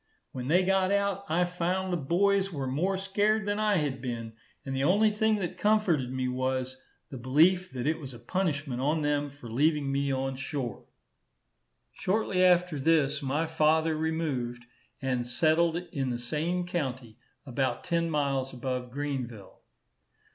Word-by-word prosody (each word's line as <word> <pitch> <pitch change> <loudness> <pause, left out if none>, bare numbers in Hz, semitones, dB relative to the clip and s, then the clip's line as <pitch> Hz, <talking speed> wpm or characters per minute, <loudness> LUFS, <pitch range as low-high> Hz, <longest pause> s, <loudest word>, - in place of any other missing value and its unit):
When 125 -1 -5
they 180 +5 +4
got 190 0 +2
out, 200 -1 0
I 175 +3 +2
found 180 +1 -1
the - - +2
boys 195 +6 +2
were 140 -5 -3
more 170 +9 0
scared 205 +2 +1
than 205 +1 -1
I 215 -1 +2
had 140 -5 -1
been, 115 -3 -5 0.3
and 135 -1 -3
the 135 - 0
only 205 +7 +4
thing 220 +1 +2
that 185 -5 -4
comforted 195 - +2
me 130 -1 -1
was, 130 0 -2 0.3
the 130 - -6
belief 165 +9 +3
that 125 -1 -4
it 155 +2 +1
was 135 -4 -8
a 120 - -10
punishment 145 -2 -2
on 150 +3 +1
them 145 0 0
for 140 -3 -12
leaving 145 +4 +1
me 140 0 0
on 135 0 -2
shore. 135 -5 -4 1.1
Shortly 190 -2 0
after 180 -4 +3
this, 150 -1 +2
my 145 +4 0
father 160 0 +2
removed, 145 -7 -2 0.4
and 125 -2 -1
settled 160 +6 +2
in 160 -7 -3
the 120 - -2
same 160 +9 -2
county, 130 -9 -4 0.3
about 135 0 -1
ten 170 -1 0
miles 140 -3 0
above 125 0 -3
Greenville. 125 -7 -5
150 Hz, 160 wpm, -29 LUFS, 130-180 Hz, 1.1 s, they